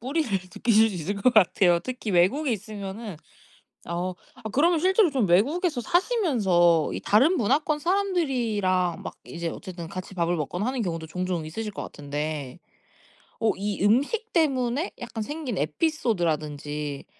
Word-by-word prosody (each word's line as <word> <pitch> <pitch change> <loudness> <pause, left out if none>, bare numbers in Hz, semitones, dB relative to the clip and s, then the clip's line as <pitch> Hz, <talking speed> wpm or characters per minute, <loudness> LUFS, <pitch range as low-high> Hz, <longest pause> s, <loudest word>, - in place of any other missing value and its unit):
뿌리를 275 +3 -1
느끼실 205 +4 +2
수 - - -6
있을 180 +4 -3
것 220 +5 +3
같아요 180 -3 +5
특히 250 +1 -5
외국에 215 - +3
있으면은. 205 -1 -6 0.7
어 175 +2 -2 0.2
아 - - -17
그러면 325 - +3
실제로 375 +3 +4
좀 265 -6 +1
외국에서 280 - +2
사시면서 220 - +2
이 - - -3
다른 270 - +3
문화권 295 +6 +1
사람들이랑 250 - 0
막 - - -7
이제 170 0 -5
어쨌든 180 -2 -7
같이 185 +2 -7
밥을 170 0 +1
먹거나 175 +6 -3
하는 255 0 -1
경우도 165 -5 -3
종종 180 0 -3
있으실 210 +7 -5
것 200 - -6
같은데 145 0 -5 0.8
어 225 -1 +3
이 200 0 -2
음식 285 - +2
때문에 275 -1 +1
약간 235 -2 -5
생긴 290 - -4
에피소드라든지 150 - -1
210 Hz, 330 characters per minute, -26 LUFS, 175-275 Hz, 0.8 s, 같아요